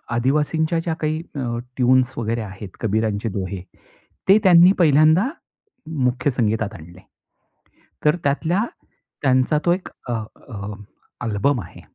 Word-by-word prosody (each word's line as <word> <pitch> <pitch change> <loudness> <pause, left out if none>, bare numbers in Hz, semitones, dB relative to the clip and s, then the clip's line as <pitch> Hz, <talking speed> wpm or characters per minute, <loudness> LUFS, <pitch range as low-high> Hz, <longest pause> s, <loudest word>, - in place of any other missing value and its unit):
आदिवासींच्या 150 +6 +1
ज्या 165 0 -2
काही 155 +1 -1
अ, 120 -4 -2 0.2
टीऊन्झ 130 0 +4
वगैरे 115 0 -1
आहेत, 100 -1 -8
कबीरांचे 110 0 0
दोहे, 95 -1 -4 0.7
ते 195 - +8
त्यांनी 180 -1 +7
पहिल्यांदा 155 - +5 0.8
मुख्य 125 +3 +1
संगीतात 110 -3 0
आणले. 85 +1 -12 1.1
तर 150 +3 +4
त्यातला 165 +9 +1 0.6
त्यांचा 130 +2 +3
तो 170 - +5
एक 180 +1 -3 0.2
अ, - - -1 0.4
अ, 105 -3 -6 0.5
आल्बम 120 +4 +1
आहे. - - -13
130 Hz, 120 wpm, -21 LUFS, 110-155 Hz, 1.1 s, ते